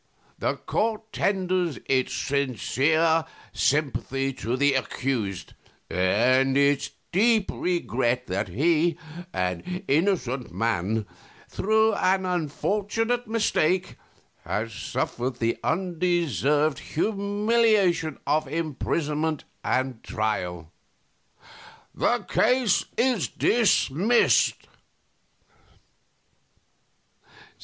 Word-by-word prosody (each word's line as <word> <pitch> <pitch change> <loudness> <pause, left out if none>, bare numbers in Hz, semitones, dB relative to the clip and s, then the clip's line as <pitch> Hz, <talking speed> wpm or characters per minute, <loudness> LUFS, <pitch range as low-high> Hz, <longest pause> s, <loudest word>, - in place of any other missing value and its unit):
The - - 0
court 220 -1 -2
tenders 185 -6 0
its 130 -1 +1
sincere 145 +4 +1 0.3
sympathy 135 -2 0
to 125 0 -3
the 140 +1 +3
accused, 115 -9 -2 0.4
and 125 +10 +3
its 140 0 +2 0.2
deep 220 +2 +3
regret 125 -8 -1
that 95 +3 -2
he, 160 - +1 0.3
an 90 - -3
innocent 140 - 0
man, 110 +1 -1 0.4
through 220 +2 +2
an 190 -1 +1
unfortunate 205 - -1
mistake, 185 -5 +1 0.5
has 110 +1 -3
suffered 125 +3 -3
the 115 -1 -1
undeserved 165 -4 +1
humiliation 200 - +1
of 150 +1 +1
imprisonment 155 0 -2 0.2
and 130 -2 -1
trial. 90 -7 -3 1.2
The - - 0
case 250 -4 +2
is 250 0 +2
dismissed." 220 - +2
155 Hz, 75 wpm, -25 LUFS, 130-190 Hz, 1.2 s, the